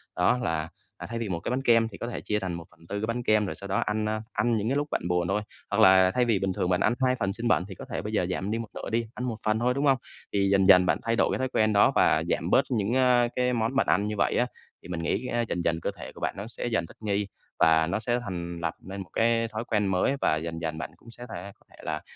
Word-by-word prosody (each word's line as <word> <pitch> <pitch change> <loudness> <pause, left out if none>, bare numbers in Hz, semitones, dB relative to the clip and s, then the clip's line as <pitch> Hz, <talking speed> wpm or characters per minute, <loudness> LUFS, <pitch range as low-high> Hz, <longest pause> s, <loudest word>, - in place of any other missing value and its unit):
Đó 90 +7 +3
là, 80 -4 -1 0.3
à, - - -7
thay 115 0 -3
vì 115 -3 -3
một 85 -3 -2
cái - - -4
bánh 130 +2 0
kem 115 -3 +4
thì - - -10
có 115 - -5
thể 120 - -5
chia 105 - -1
thành 95 -3 -3
1/4 85 +3 -7
cái 110 - -1
bánh 120 +1 -2
kem, 110 -2 +3
rồi - - -4
sau 100 - -8
đó 95 - +1
ăn, 105 0 -1
a, 110 0 -2
ăn 120 -2 +1
những 105 +2 -1
cái 135 - +1
lúc 145 +1 0
bạn - - -1
buồn 90 -1 +1
thôi. 105 +3 0 0.3
Hoặc 100 - +1
là 95 -2 +7
thay 125 +5 +2
vì 115 -5 +2
bình 95 -1 -1
thường 90 - -1
bạn 90 - +2
ăn - - +3
2 130 0 +3
phần 100 -2 0
xiên 115 +3 -3
bẩn 90 -6 +3
thì 95 - -7
có - - -9
thể - - -3
bây 105 +1 -5
giờ 105 - +2
giảm 95 +2 -2
đi 115 - 0
một 115 - -5
nửa - - -6
đi, 115 +1 0
ăn 125 - -4
1 120 -3 -2
phần 110 0 +2
thôi, 125 +2 +2
đúng 140 +3 -1
hông? 135 -2 +5 0.4
Thì 100 -1 +2
dần 95 -1 +4
dần 90 -2 +8
bạn 90 - +2
thay 115 0 +1
đổi - - +2
cái - - -1
thói 130 0 -1
quen 110 -3 +2
đó 100 - +5
và - - +4
giảm - - 0
bớt - - +4
những, 110 -2 0
a, 125 -2 +4
cái 125 0 +1
món 115 +2 0
bạn 135 - +2
ăn 100 +6 +2
như 105 - -2
vậy - - +1
á, 125 - +2 0.4
thì - - -10
mình 85 -2 -4
nghĩ 125 - -1
á 120 -1 0
dần 85 - -1
dần 80 -1 0
cơ - - -1
thể - - -8
của - - -14
bạn - - -1
nó 100 +2 -5
sẽ 115 - -6
dần 115 -8 0
thích - - -16
nghi 100 -1 -1 0.3
và 80 0 +5
nó 100 +5 -1
sẽ 120 +2 0
thành 85 -6 -5
lập 85 -1 -2
nên 95 +1 -7
một 90 - -10
cái 115 0 +2
thói 110 0 -4
quen 105 -2 +1
mới. 95 +8 +1
Và - - +3
dần 80 +1 -4
dần 80 -1 -3
bạn 80 - -5
cũng 115 - -15
sẽ 120 +1 -10
thể 100 +3 -7
có - - -28
thể - - -19
là 75 0 -3
105 Hz, 315 wpm, -27 LUFS, 90-115 Hz, 0.4 s, dần